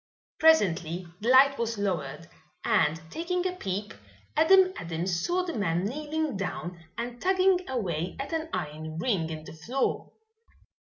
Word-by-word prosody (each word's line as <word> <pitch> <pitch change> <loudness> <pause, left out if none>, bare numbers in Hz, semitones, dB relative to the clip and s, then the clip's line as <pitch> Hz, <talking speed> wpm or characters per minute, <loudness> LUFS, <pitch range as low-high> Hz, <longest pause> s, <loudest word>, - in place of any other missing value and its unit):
Presently 185 - +3
the 225 +3 -1
light 275 +2 +6
was 230 -1 -1
lowered, 170 -6 -2 0.4
and 160 0 +3
taking 355 +2 -2
a 370 - +1
peep 205 - -4 0.4
Adam 370 +4 +6
Adams 170 +1 -2
saw 365 +1 +1
the 345 -2 -4
man 175 -5 0
kneeling 300 +5 -2
down 180 -3 -5
and 240 +1 -5
tugging 375 0 +4
away 180 -9 -2
at 275 +4 -4
an 320 0 -2
iron 155 0 -4
ring 170 -5 0
in 155 -1 -6
the - - -10
floor. 235 - -2
220 Hz, 145 wpm, -28 LUFS, -, 0.4 s, light